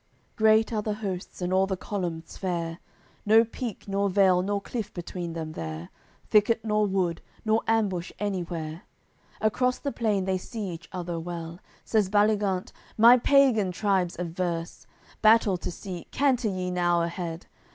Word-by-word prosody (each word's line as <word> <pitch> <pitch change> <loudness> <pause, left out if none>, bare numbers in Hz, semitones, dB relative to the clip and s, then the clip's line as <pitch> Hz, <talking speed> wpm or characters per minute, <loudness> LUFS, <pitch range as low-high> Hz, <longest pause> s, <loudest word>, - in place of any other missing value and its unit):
AOI. - - -43
CCXXXVII - - -39
Great 220 +1 +4
are 215 - 0
the 210 0 -2
hosts, 190 -4 -5
and 180 +1 -1
all 190 +1 +3
the 190 -1 -2
columns 175 -4 -4
fair, 170 -3 -3 0.4
No 220 +2 +6
peak 230 -2 -6
nor 200 0 0
vale 190 -2 +4
nor 200 +2 -1
cliff 210 0 -5
between 175 -1 -5
them 160 -1 -5
there, 80 - -6 0.4
Thicket 220 +2 +3
nor 210 -1 +2
wood, 185 -4 0 0.2
nor 220 +1 +3
ambush 200 -6 0
anywhere; 175 -5 -3 0.6
Across 250 +4 +1
the 280 - -3
plain 210 -7 0
they 190 -1 0
see 215 0 -5
each 170 0 -9
other 175 -2 -4
well. 170 0 -6 0.3
Says 215 -4 +2
Baligant: 205 -2 +2 0.3
"My 235 +3 +8
pagan 235 -7 +4
tribes 190 -2 0
adverse, 170 -1 -4 0.3
Battle 215 -3 +5
to - - -5
seek, 180 -1 -7
canter 255 -5 +1
ye 185 -1 -3
now 175 -1 +2
ahead!" 170 -1 -4
190 Hz, 160 wpm, -27 LUFS, 175-215 Hz, 0.6 s, My